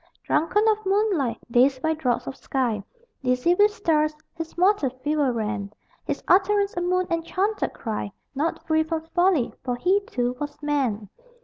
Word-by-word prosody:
Drunken 415 +7 +2
of 430 0 +2
moonlight, 385 - +1
dazed 260 +2 +3
by 320 0 +2
draughts 255 -7 -1
of 270 - -5
sky, 240 -7 -1 0.4
Dizzy 250 +6 +2
with 410 +3 +5
stars, 310 -8 +1 0.2
his 330 0 -7
mortal 365 -6 +3
fever 280 +2 0
ran: 215 -3 -3 0.3
His - - -3
utterance 400 +2 +3
a 350 - -1
moon 365 +1 +1
enchanted 370 +5 -1
cry 215 -3 -4 0.2
Not 295 +4 -2
free 315 -1 +2
from 315 0 -2
folly 350 -8 +2
for 250 -1 -1
he 365 +10 +2
too 245 0 -1
was 290 0 -5
man. 260 -8 0
310 Hz, 155 wpm, -24 LUFS, 250-365 Hz, 0.4 s, with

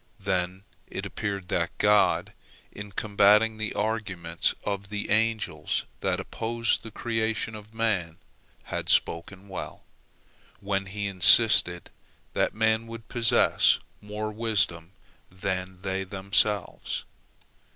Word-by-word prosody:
Then 90 +1 -2 0.2
it - - -6
appeared 100 -4 -4
that - - -1
God, 105 0 +3 0.4
in 100 0 -9
combating 105 +2 +3
the 110 0 -3
arguments 95 -7 -1
of 100 -1 -4
the 105 -1 -4
angels 110 0 0
that - - -1
opposed 115 +1 -1
the 115 - -9
creation 110 0 -2
of 105 +1 -11
man, 95 -8 -1 0.5
had - - -5
spoken 95 +4 +1
well, 95 - -7 0.8
when 100 -1 -2
He 100 +1 -4
insisted 95 -1 +6 0.4
that - - 0
man 110 +1 +1
would 115 -1 -10
possess 115 -3 +4 0.2
more 105 +1 -5
wisdom 105 -7 0 0.4
than 95 0 -4
they 95 0 -2
themselves. 100 +1 -1
105 Hz, 110 wpm, -26 LUFS, 95-110 Hz, 0.8 s, insisted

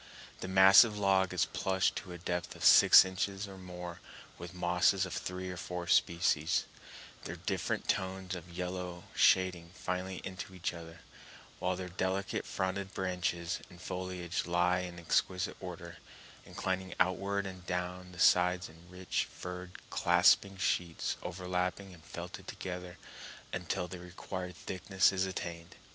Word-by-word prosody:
The - - -5
massive 95 +3 +7
log 95 -2 +3
is 90 -1 +2
plushed 95 0 0
to 90 - -6
a 90 - -6
depth 85 0 -3
of - - -4
six - - +9
inches 95 +2 -3
or 95 -1 -10
more 90 -2 -8 0.4
with 85 0 -7
mosses 90 +2 +2
of 95 - -6
three 90 +1 -4
or 90 - -7
four 90 0 -5
species, 85 -2 +2 0.6
their - - -5
different - - -2
tones 95 0 -1
of 90 -1 -7
yellow 90 0 -5
shading 90 -3 +3
finely 90 0 -3
into 95 0 -7
each 90 -1 -2
other, 85 -1 -10 0.6
while 90 0 0
their 90 0 -5
delicate 95 +2 -2
fronded 95 +1 -3
branches 90 -2 -1
and 90 -2 -14
foliage 90 -1 -4
lie 90 +1 +2
in 90 -1 -6
exquisite 90 +2 0
order, 85 -2 -8 0.5
inclining 95 0 -3
outward 100 +2 +1
and 90 -2 -8
down 90 0 -3
the 90 - -13
sides 90 0 +4
in 85 +2 -17
rich, 90 0 -2
furred, 90 0 -7 0.2
clasping 100 -1 +4
sheets 85 -2 0
overlapping 90 +1 -3
and 80 -3 -16
felted - - -8
together 90 -1 -6 0.6
until 90 0 -2
the 90 0 -8
required 90 +1 -6
thickness 95 +1 +1
is 95 0 0
attained. 85 -2 -6
90 Hz, 145 wpm, -32 LUFS, 90-95 Hz, 0.6 s, six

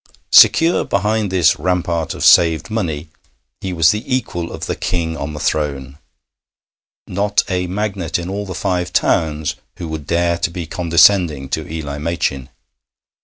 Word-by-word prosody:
Secure 165 +2 +6
behind 105 0 -1
this 90 -5 +3
rampart 85 -1 -1
of - - -2
saved 80 +4 +4
money, 80 -8 -3 0.5
he 95 - -5
was 80 -3 +4
the 105 +1 -3
equal 95 -10 -2
of - - -6
the - - -3
King 80 -2 -2
on 75 0 -5
the 75 - -6
throne. 70 -2 -2 1.1
Not 100 +2 0
a 90 -2 -1
magnate 95 -3 -2
in 85 0 -6
all 100 +2 -4
the 95 - -6
Five 90 -3 -2
Towns 75 -1 0 0.2
who 85 - -6
would 80 -3 -6
dare 85 0 +1
to 95 - 0
be 85 0 -6
condescending 85 -4 +3
to 80 +2 -4
Eli 75 -3 -5
Machin. 75 -5 -2
85 Hz, 155 wpm, -18 LUFS, 80-95 Hz, 1.1 s, Secure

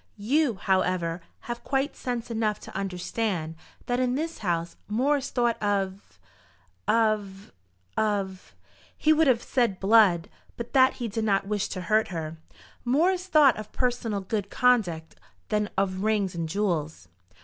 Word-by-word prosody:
You, 250 +4 +1
however, 185 -3 0 0.2
have 240 0 -6
quite 275 +2 -1
sense 245 -2 -4
enough 220 -2 0
to - - -11
understand, 190 -2 -2 0.3
that 245 0 0
in 255 0 +1
this 325 +3 -3
house 170 -4 -2
more 260 +8 +2
is 275 - -4
thought 240 -2 0
of 200 -1 -2 0.7
of 210 -3 0 0.4
of 200 -3 -2 0.2
" - - -29
he 310 - +4
would 315 0 +3
have 240 -3 +3
said 235 -8 0
blood, 195 -5 +5 0.3
but 235 0 -6
that 260 -1 +6
he 240 - -3
did 225 +1 -3
not 200 -3 +2
wish 210 0 -1
to 185 - -5
hurt 215 +4 +2
her, 165 -2 -5 0.5
"more 295 +9 +3
is 370 0 -4
thought 300 -7 +5
of 215 0 -8
personal 240 -5 -1
good 200 +1 -3
conduct 195 -12 +1 0.4
than 210 0 0
of 190 -1 0
rings 210 -3 +1
and 165 -2 -3
jewels." 160 - -2
210 Hz, 155 wpm, -26 LUFS, 190-245 Hz, 0.7 s, that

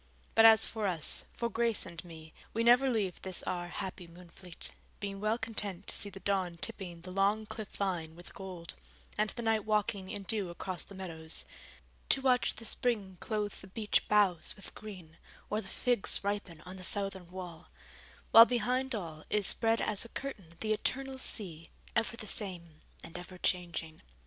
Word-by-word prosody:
But 225 0 +9
as 220 -1 +8
for 220 -2 -1
us, 170 -5 +2
for 235 - 0
Grace 230 -2 +2
and 170 -3 -8
me, 160 -2 -11 0.2
we 230 - +2
never 250 +3 +6
leave 205 -7 -1
this 190 -2 0
our 175 -1 -2
happy 180 0 -5
Moonfleet, 175 +1 -5 0.3
being 200 -1 -4
well 215 +2 +1
content 210 -5 -1
to - - -2
see 205 - -2
the 195 - -9
dawn 190 -4 0
tipping 175 -3 -3
the 185 +2 -8
long 200 +3 +2
cliff 215 0 -7
line 175 -5 -1
with 175 +1 -12
gold, 185 -3 -6 0.4
and 215 0 +1
the 235 - -3
night 220 -2 +2
walking 210 -2 0
in 200 - -5
dew 200 -2 +1
across 180 +1 -4
the 200 - -12
meadows; 165 -4 0 0.6
to - - +5
watch 255 -2 +3
the 230 - -7
spring 210 -7 0
clothe 210 -2 -2
the 190 - -10
beech 210 +2 0
boughs 195 -6 +3
with 195 - -10
green, 180 -7 -10 0.3
or 210 +1 +1
the 195 - -9
figs 240 +1 +1
ripen 200 -5 -3
on 185 +2 -9
the 185 - -9
southern 195 -2 0
wall: 180 -3 -8 0.6
while 230 0 +12
behind 250 +2 +1
all, 160 -6 -6
is 210 -2 +3
spread 225 +2 +3
as 210 -2 +3
a 230 - -9
curtain 200 -13 -6
the 215 -1 +2
eternal 265 +4 -1
sea, 165 -10 -5 0.3
ever 230 0 +1
the 220 - -6
same 175 -7 -4 0.2
and 170 - -7
ever 180 +1 -9
changing. 170 -3 -2
195 Hz, 180 wpm, -32 LUFS, 175-220 Hz, 0.6 s, while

